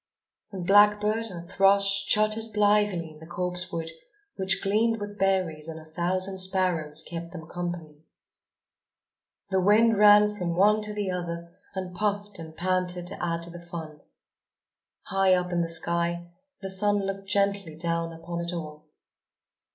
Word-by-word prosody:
And 185 -3 -6
blackbird 210 +3 +4
and 175 -4 -8
thrush 195 +1 +3
chattered 215 +1 +2
blithely 205 -5 +2
in 155 - -15
the 160 - -12
copsewood, 180 -2 -3 0.4
which 190 -1 -1
gleamed 225 +3 +1
with 205 0 -7
berries, 180 -5 0
and 160 0 -7
a 155 - -14
thousand 185 +4 -1
sparrows 180 -5 0
kept 170 0 -7
them 165 -3 -8
company. 175 -3 -6 1.5
The 190 0 +2
wind 215 +3 +4
ran 210 0 +6
from 175 -3 -3
one 210 +3 +4
to 210 0 -2
the 205 -3 -2
other 170 -1 -5 0.2
and 185 -1 -5
puffed 205 0 -2
and 160 -1 -10
panted 180 0 0
to 195 - -7
add 170 -1 -2
to 170 - -4
the 175 0 -10
fun. 165 -3 -8 1.0
High 195 -2 +3
up 180 0 -2
in 175 - +1
the 165 - -2
sky, 170 +1 0 0.3
the 195 - -4
sun 205 +1 +2
looked 195 0 -5
gently 200 -4 0
down 165 0 -2
upon 170 +1 -6
it 170 - -3
all. 155 -3 -7
180 Hz, 150 wpm, -26 LUFS, 170-200 Hz, 1.5 s, ran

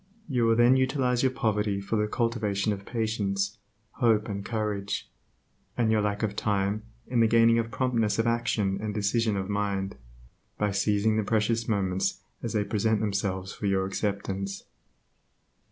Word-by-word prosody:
You 125 -6 +1
will 115 - +4
then 120 +3 +5
utilize 130 -2 +1
your 130 - +3
poverty 105 -5 0
for 100 +3 -3
the 105 0 +1
cultivation 105 -3 0
of 100 0 -8
patience, 100 -4 -1 0.4
hope 110 -4 +3
and 100 -2 -4
courage; 105 -3 -3 0.7
and 115 -2 +2
your 110 -1 +3
lack 105 +1 -1
of 105 -1 -1
time 105 0 0 0.2
in 120 -1 0
the 115 - +5
gaining 115 0 +5
of 115 0 -2
promptness 115 -5 0
of 115 - +1
action 115 -4 0
and 105 -1 -3
decision 105 +1 +1
of 95 -1 -2
mind, 100 -1 -1 0.6
by 105 -1 +1
seizing 105 +2 +2
the 110 - +1
precious 115 +2 +1
moments 95 -3 0 0.2
as 115 - -3
they 105 -2 +2
present 110 +1 +1
themselves 100 -2 -2
for 105 - -3
your 95 -1 +2
acceptance. 100 0 -3
105 Hz, 160 wpm, -27 LUFS, 100-115 Hz, 0.7 s, then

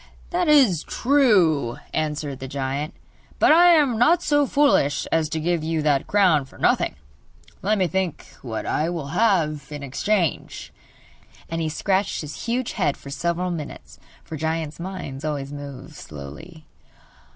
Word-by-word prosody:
'That 355 -1 0
is 260 - +5
true,' 190 - +2 0.2
answered 150 -3 -2
the 135 - -6
giant; 140 +3 -3 0.4
'but - - +5
I 345 +3 +7
am 280 -8 +3
not 335 +8 +4
so 290 -1 +2
foolish 275 - +2
as 160 -2 +1
to 160 - -2
give 170 0 0
you 160 -1 -1
that 145 -3 +1
crown 185 -8 +3
for - - -18
nothing. - - +1 0.7
Let 210 +2 +1
me 190 - +2
think 185 -1 -2 0.2
what 115 -4 -5
I 155 +2 0
will 165 -5 -4
have 160 -7 +1
in 145 -1 -7
exchange!' 170 +6 -2 0.8
And 165 0 -2
he 160 - -1
scratched 190 +5 0
his 150 -2 -7
huge 245 +1 -1
head 155 -9 0
for 140 - -11
several 170 +5 -1
minutes, 155 -4 -8 0.2
for 160 - -7
giants' 160 0 -3
minds 170 -7 -6
always 145 -2 -3
move 145 -2 -9
slowly. 75 - -10
160 Hz, 150 wpm, -23 LUFS, 145-200 Hz, 0.8 s, I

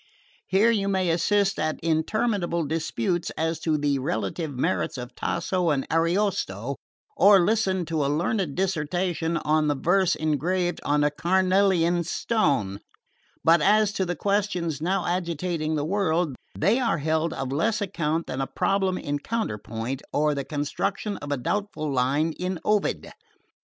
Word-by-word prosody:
Here 205 +5 +4
you 200 -3 0
may 190 -3 +1
assist 195 +4 +1
at 155 0 -1
interminable 170 +1 0
disputes 160 +1 -1
as 160 0 -1
to 160 -2 0
the 145 -2 0
relative 130 - -2
merits 130 - -1
of 125 0 -7
Tasso 180 -3 -1
and 140 -3 0
Ariosto, 165 - 0 0.4
or 200 +2 +7
listen 190 -2 +1
to 160 -2 -1
a - - +1
learned 165 +1 -1
dissertation 175 -1 -1
on 155 -1 +1
the 145 - +1
verse 180 +6 +2
engraved 175 +4 -1
on 145 0 +2
a 150 - +2
carnelian 180 +1 +2
stone; 140 - 0 0.6
but 165 0 +5
as 210 +3 +4
to 195 - 0
the 175 -1 -2
questions 180 -5 -1
now 185 +2 0
agitating 170 -2 -1
the 145 -1 -1
world, 170 -5 0 0.2
they 205 +10 +3
are 230 -9 +1
held 160 +2 0
of 135 -3 -4
less 210 +10 +1
account 165 -5 -1
than 130 +1 -4
a 135 - -1
problem 190 0 0
in 145 0 -3
counterpoint 130 - -3
or 150 +1 +2
the 140 -1 -3
construction 155 +9 -2
of 145 0 -7
a 145 - +1
doubtful 155 - -2
line 140 +5 +1
in 180 0 -2
Ovid. 210 -1 0
170 Hz, 150 wpm, -25 LUFS, 150-190 Hz, 0.6 s, or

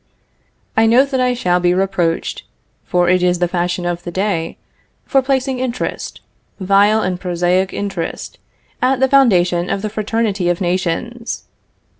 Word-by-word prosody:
I 225 0 +4
know 245 +4 +5
that 275 -2 -2
I 250 -1 +2
shall 180 -7 +1
be 180 0 +2
reproached 185 -3 -1 0.4
(for 180 -1 +1
it 180 0 +3
is 180 0 +2
the 175 0 +1
fashion 175 0 -2
of 175 0 -2
the 175 - -7
day) 175 -2 -2 0.5
for 270 - +2
placing 265 -1 -1
interest, 250 -1 -4 0.4
vile 200 +3 +3
and 180 -1 -2
prosaic 180 +1 0
interest, 195 -5 -5 0.4
at 255 +1 +2
the 265 - +4
foundation 180 -10 +3
of 195 +1 -2
the 215 - -3
fraternity 215 -3 -1
of 175 - 0
nations. 185 +6 -2
190 Hz, 150 wpm, -17 LUFS, 175-230 Hz, 0.5 s, know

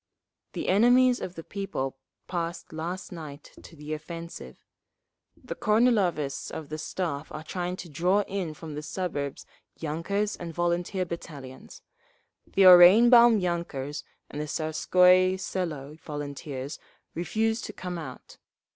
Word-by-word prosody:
The - - -4
enemies 245 +5 +5
of 180 - -5
the 165 - -7
people 145 -11 -4 0.3
passed 170 -2 -4
last 170 +4 -5
night 155 -4 -9
to 165 - -14
the 150 0 -6
offensive. 165 - -8 0.7
The - - -7
Kornilovists 210 - +1
of 155 - -7
the 155 +1 -5
Staff 155 -2 -4
are 155 - -6
trying 180 +2 -3
to 180 - -8
draw 180 +6 +2
in 190 -6 -4
from 155 0 -8
the 150 - -5
suburbs 150 -4 -4 0.3
yunkers 185 +7 -2
and 170 -2 -8
volunteer 175 +2 0
battalions. 145 -6 -9 0.7
The 195 - +3
Oranienbaum 220 +6 +8
yunkers 160 -5 -3 0.2
and 150 - -6
the - - -3
Tsarskoye 180 +4 +3
Selo 155 -6 -4
volunteers 145 -2 -6 0.3
refused 220 +7 -1
to 210 - -7
come 180 -3 -5
out. 160 - -10
170 Hz, 130 wpm, -27 LUFS, 150-190 Hz, 0.7 s, Oranienbaum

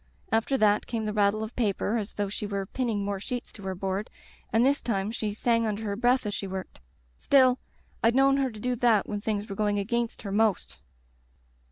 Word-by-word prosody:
After 225 +5 +2
that 210 -3 +3
came 225 -2 -2
the 210 - -2
rattle 210 +1 +2
of 220 +2 -7
paper 215 -1 0
as 210 -2 -4
though 205 -1 -1
the 210 - -4
were 200 -1 -2
pinning 220 -3 -2
more 200 -1 -2
sheets 245 +5 -5
to 205 - -12
her 190 -1 -4
board, 195 +3 -3 0.4
and 225 +2 +4
this 280 +1 +2
time 205 -3 -1
she 215 -2 -2
sang 230 +2 +1
under 215 +1 -3
her 205 -2 -2
breath 245 +2 +2
as 205 - -2
she 200 - -4
worked. 190 0 -6 0.4
Still, 260 -2 +4 0.4
I'd 230 +2 +4
known 275 +1 +5
her 270 -1 +1
to 215 -3 -10
do 250 +3 -1
that 225 -4 +3
when 205 -1 -3
things 210 -1 -2
were 200 - -6
going 205 0 +1
against 230 +3 -2
her 200 - -4
most. 215 -1 0
215 Hz, 215 wpm, -27 LUFS, 205-235 Hz, 0.4 s, known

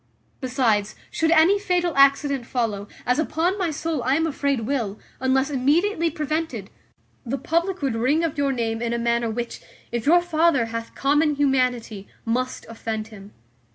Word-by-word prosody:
Besides, 240 -6 0 0.2
should 320 - +1
any 340 +5 +5
fatal 355 -3 0
accident 275 -2 +3
follow, 215 -5 -2 0.2
as 250 +4 +2
upon 335 +5 0
my 360 -3 0
soul 315 -1 -2
I 260 +3 +2
am 320 +2 +1
afraid 280 -4 -1
will, 225 -4 -2 0.2
unless 265 +2 +1
immediately 330 +7 +2
prevented, 305 - -3 0.5
the 265 +2 -3
public 335 +5 -1
would 270 -4 +1
ring 260 +8 +1
of 325 -3 -1
your 280 -1 +1
name 225 -3 -2
in 235 0 -1
a - - 0
manner 235 0 0
which, 235 +2 -4 0.3
if 235 +2 -3
your 345 +3 +6
father 325 -6 +2
hath 230 0 -5
common 295 +2 +2
humanity, 250 -7 0 0.2
must 255 +3 -2
offend 225 -1 -5
him. 205 -2 -12
270 Hz, 160 wpm, -23 LUFS, 235-320 Hz, 0.5 s, your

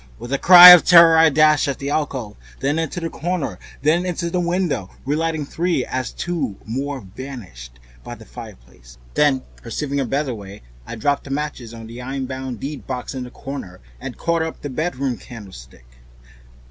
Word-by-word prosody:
With 120 +3 -7
a 140 - 0
cry 180 0 +11
of 180 -2 +9
terror 170 -2 +7
I 160 0 +6
dashed 155 +1 +3
at 140 - -2
the 140 +1 -5
alcove, 130 -9 -3 0.2
then 145 +4 -1
into 165 +2 -3
the 165 -1 -5
corner 175 -3 -3
and - - -19
then 160 +4 +2
into 170 -1 -3
the 180 - -1
window, 170 - -1 0.2
relighting 155 +1 -1
three 165 -3 -1
as 130 -2 -4
two 150 - -4
more 135 +4 -4
vanished 95 - -10 0.2
by - - -8
the - - -15
fireplace, - - -13
and - - -25
then, 145 -3 +2 0.2
perceiving 140 +4 -4
a 135 - 0
better 135 +1 -2
way, 100 -2 -11 0.2
I - - -6
dropped 140 +4 -1
matches 135 -5 -4
on 115 -1 -10
the 115 +2 -9
iron 135 +1 -4
bound 130 -2 -6
deedbox 135 -3 -6
in 130 -2 -5
the - - -10
corner, 125 -9 -8 0.2
and - - -8
caught 170 -1 0
up 160 0 -5
the 145 - -5
bedroom 135 -4 -2
candlestick. 95 - -13
140 Hz, 185 wpm, -20 LUFS, 120-160 Hz, 0.2 s, cry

